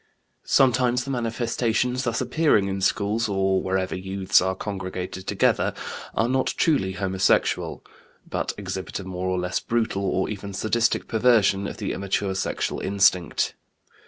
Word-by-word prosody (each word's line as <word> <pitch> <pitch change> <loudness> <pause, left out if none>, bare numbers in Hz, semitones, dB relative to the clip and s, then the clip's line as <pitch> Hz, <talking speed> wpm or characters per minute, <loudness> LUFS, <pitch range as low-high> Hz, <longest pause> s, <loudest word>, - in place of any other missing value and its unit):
Sometimes 125 -1 +3
the 135 - -5
manifestations 120 +1 -1
thus 120 0 0
appearing 125 -5 +2
in 95 0 -3
schools 105 +3 +1
or 95 -1 +1
wherever 95 0 -1
youths 95 +1 +2
are 95 0 0
congregated 95 -2 -5
together - - +1 0.4
are 115 - +2
not 130 +1 0
truly 115 - +2
homosexual, 95 0 0 0.4
but - - -2
exhibit 95 +1 -5
a - - -6
more 90 0 -4
or 95 - 0
less 90 0 -1
brutal 110 -4 -1
or 95 -1 0
even 100 -2 -6
sadistic 115 +3 +1
perversion 110 -4 +3
of - - -7
the 105 -4 -3
immature 100 0 -1
sexual 95 - -2
instinct. 95 -4 +2
100 Hz, 140 wpm, -24 LUFS, 95-115 Hz, 0.4 s, Sometimes